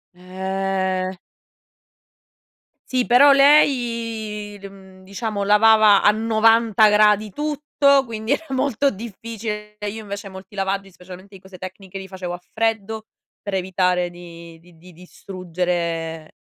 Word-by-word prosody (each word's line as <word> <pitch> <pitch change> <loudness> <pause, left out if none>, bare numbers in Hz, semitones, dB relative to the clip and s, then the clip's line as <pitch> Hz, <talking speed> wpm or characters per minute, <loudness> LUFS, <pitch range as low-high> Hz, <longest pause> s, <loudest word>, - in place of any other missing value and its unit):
Eh. 190 0 -3 1.8
Sì 255 -1 +1
però 260 +4 +6
lei 230 -7 +2
l 200 - -8
mhmm 190 -1 -16
diciamo 200 +1 -4
lavava 210 0 +5
a - - +6
90 225 0 +3
gradi 210 0 +3
tutto, 290 -2 +1
quindi 225 0 -5
era 325 +3 -4
molto 270 0 +1
difficile. 210 0 -7
E 210 - -3
io 220 +2 -7
invece 200 -1 -7
molti 190 +1 -12
lavaggi, 195 0 -2
specialmente 185 +2 -13
di 190 - -14
cose 190 -1 -14
tecniche 190 +1 -9
li 190 - -9
facevo 185 -2 -6
a 175 - -7
freddo 220 -1 -2 0.4
per 200 - -6
evitare 180 -1 0
di 170 -1 -12
di 170 0 -21
di 180 +2 -16
distruggere, 170 -2 -4
200 Hz, 125 wpm, -21 LUFS, 185-225 Hz, 1.8 s, però